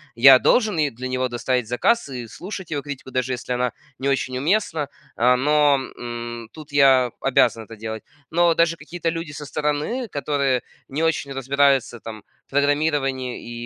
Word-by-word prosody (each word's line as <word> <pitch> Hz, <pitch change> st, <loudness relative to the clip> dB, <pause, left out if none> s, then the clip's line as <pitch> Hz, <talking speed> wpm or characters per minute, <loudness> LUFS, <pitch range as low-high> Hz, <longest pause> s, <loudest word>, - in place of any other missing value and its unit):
я 130 Hz, +2 st, +8 dB
должен 215 Hz, -, +3 dB
ей 150 Hz, -, +2 dB
для 130 Hz, +1 st, -6 dB
него 130 Hz, 0 st, -1 dB
доставить 125 Hz, -1 st, -1 dB
заказ 145 Hz, -, +1 dB
и 125 Hz, -3 st, -6 dB
слушать 185 Hz, -, -8 dB
его 145 Hz, -2 st, -1 dB
критику, 140 Hz, -2 st, -8 dB
даже 130 Hz, 0 st, -1 dB
если 125 Hz, 0 st, -4 dB
она 125 Hz, 0 st, -1 dB, 0.3 s
не 135 Hz, -, 0 dB
очень 130 Hz, -2 st, -1 dB
уместна. 160 Hz, -2 st, 0 dB, 0.3 s
О, 125 Hz, +2 st, +4 dB
но, 145 Hz, +2 st, +4 dB, 0.2 s
м, 120 Hz, -1 st, -6 dB
тут 155 Hz, -1 st, -12 dB
я 135 Hz, -4 st, +5 dB
обязан 120 Hz, -4 st, +2 dB
это 115 Hz, -, -11 dB
делать. 110 Hz, 0 st, -6 dB, 0.3 s
Но 170 Hz, 0 st, +3 dB
даже 170 Hz, 0 st, +3 dB
какие-то 165 Hz, +1 st, -4 dB
люди 165 Hz, -2 st, -4 dB
со 150 Hz, 0 st, -7 dB
стороны, 150 Hz, -, -2 dB
которые 140 Hz, -, 0 dB, 0.2 s
не 150 Hz, +4 st, -2 dB
очень 155 Hz, -4 st, 0 dB
разбираются 135 Hz, -2 st, +2 dB
там 110 Hz, -2 st, -9 dB, 0.2 s
в -, -, -55 dB
программировании 135 Hz, -4 st, -1 dB
135 Hz, 165 wpm, -22 LUFS, 125-150 Hz, 0.3 s, я